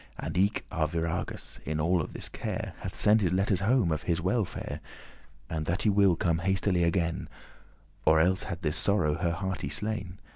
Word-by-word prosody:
And - - -5
eke 100 +4 +1
Arviragus, 85 +2 -2
in 80 0 -2
all 85 +1 +2
this - - -6
care, - - -4
Hath - - -6
sent 105 +1 +4
his 90 -4 +1
letters 95 0 +2
home 110 -3 +2
of 80 - -1
his 85 -1 0
welfare, 95 +3 -2 0.7
And 80 0 -3
that 90 +5 0
he 105 - +4
will 100 -3 +4
come 85 -1 +1
hastily 95 0 +1
again, 85 -1 0 0.7
Or 80 0 +5
elles 90 +3 +2
had 95 -3 -5
this 75 -1 +1
sorrow 100 -7 +3
her 85 -1 +1
hearty 95 +2 -3
slain. 105 -4 -3
90 Hz, 175 wpm, -29 LUFS, 85-100 Hz, 0.7 s, Or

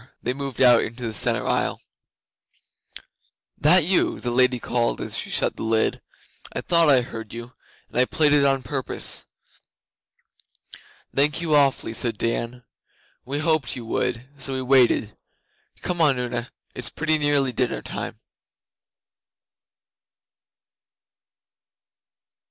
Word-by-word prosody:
They 125 - 0
moved 135 -1 -6
out 120 -2 +7
into 120 +2 -6
the 115 -2 -3
centre 105 - 0
aisle. - - 0 1.8
'That 170 +4 +5
you?' 180 +3 +1
the 120 - -3
Lady 125 0 +3
called 120 0 -1
as - - -4
she - - -4
shut - - 0
the - - -7
lid. 110 0 0 0.5
'I - - -2
thought 170 -2 +4
I 130 -3 +6
heard 115 -3 -8
you, 120 +1 -9 0.3
and - - -3
I 125 - +5
played 150 +2 +2
it 145 -1 +5
on 135 -1 +2
purpose.' 135 -1 -5 1.9
'Thank 145 +3 +2
you 165 -2 -1
awfully,' 140 -5 +2
said 115 -1 -1
Dan. 120 +2 -2 0.6
'We 140 +3 -3
hoped 155 -6 0
you 120 -2 -7
would, 120 +2 -2
so 135 0 -3
we 130 0 -3
waited. 125 -5 +3 0.7
Come 175 -1 -1
on, 145 -5 +4
Una, 120 -1 -3 0.2
it's 125 - -1
pretty 155 0 0
nearly 145 -3 +2
dinner 125 0 -2
time. - - -6
130 Hz, 130 wpm, -23 LUFS, 120-145 Hz, 1.9 s, out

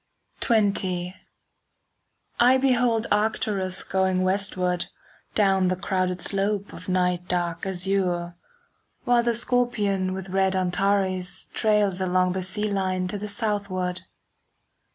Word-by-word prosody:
XX 190 -5 +1 1.3
I 250 +2 +6
behold 245 -4 +2
Arcturus 205 -3 0
going 190 -1 0
westward 185 -2 0 0.5
Down 195 -3 +3
the 185 - +1
crowded 185 -1 -2
slope 200 0 -1
of - - -9
night 180 -1 0
dark 175 0 -1
azure, 180 -2 -1 0.7
While 245 -1 +3
the 235 -1 0
Scorpion 210 -6 +1
with 190 0 -6
red 190 0 +1
Antares 185 0 0
Trails 205 -4 +1
along 185 0 +2
the 190 +1 -2
sea 210 +3 -1
line 185 -2 -1
to 205 - -3
the 210 - -5
southward. 200 -4 0
190 Hz, 110 wpm, -25 LUFS, 185-210 Hz, 1.3 s, I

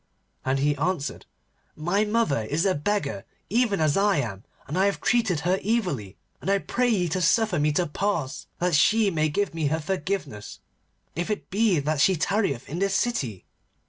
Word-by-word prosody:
And 130 +1 +1
he 145 +2 +1
answered, 155 -2 -2 0.5
'My 175 +7 +1
mother 210 - +1
is 155 - 0
a 190 - +3
beggar 145 - -2 0.3
even 230 -4 +2
as 155 -2 +2
I 200 -2 +3
am, 110 -8 -3 0.2
and 150 - -4
I 190 +2 +3
have 200 - -1
treated 220 -10 +1
her 180 +4 +1
evilly, 180 - -1 0.2
and 165 - -3
I 200 - +4
pray 245 +5 0
ye 190 -6 +2
to 185 +3 -1
suffer 200 +1 +3
me 150 +1 +2
to 175 +4 +1
pass 165 -4 -2
that 180 0 0
she 210 +7 +4
may 155 -2 +1
give 200 +5 -1
me 160 -3 -1
her 160 +3 0
forgiveness, 165 - -4 0.6
if 175 +4 -2
it 210 - -4
be 205 -2 +3
that 145 0 0
she 190 - +5
tarrieth 175 - 0
in 165 +5 -4
this 195 +1 +1
city. 140 - -1
180 Hz, 185 wpm, -25 LUFS, 145-200 Hz, 0.6 s, she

